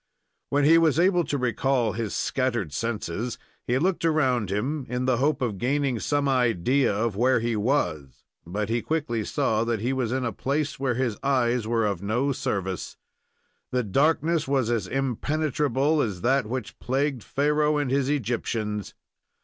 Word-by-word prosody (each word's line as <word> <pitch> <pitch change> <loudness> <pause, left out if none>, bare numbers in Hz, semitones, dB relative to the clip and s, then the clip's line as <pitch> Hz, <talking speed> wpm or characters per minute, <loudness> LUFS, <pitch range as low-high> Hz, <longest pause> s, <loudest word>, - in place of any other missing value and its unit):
When 145 +1 +2
he 165 +2 +7
was 160 -3 +3
able 175 0 +4
to 145 - -1
recall 125 -1 +1
his 110 -2 -3
scattered 120 - -1
senses, 115 +1 -3 0.3
he 125 - +2
looked 180 +5 0
around 130 - +2
him 130 +8 -2
in 125 +1 -1
the 130 -2 +2
hope 140 +1 +1
of 105 -6 -2
gaining 135 -1 0
some 145 +3 0
idea 125 0 +2
of 105 +1 -1
where 125 +3 +3
he 115 0 -1
was; 90 - -1 0.2
but 100 +5 -3
he 115 +1 0
quickly 140 -8 -1
saw 115 -4 0
that 115 -2 -1
he 120 +5 -1
was 125 -4 -1
in 130 0 -1
a 115 - -1
place 140 +7 -2
where 130 -3 0
his 120 -4 -1
eyes 125 -4 +1
were 115 -1 +1
of 100 -4 -1
no 120 +8 0
service. 95 -7 -3 0.7
The 125 0 0
darkness 155 - +1
was 135 -4 +1
as 110 -6 -1
impenetrable 145 +2 0
as 100 -8 -2
that 130 -1 +2
which 125 -1 -5
plagued 135 0 -1
Pharoah 150 +1 +1
and 145 -3 -1
his 135 0 +1
Egyptians. 115 -6 -2
125 Hz, 165 wpm, -25 LUFS, 115-140 Hz, 0.7 s, he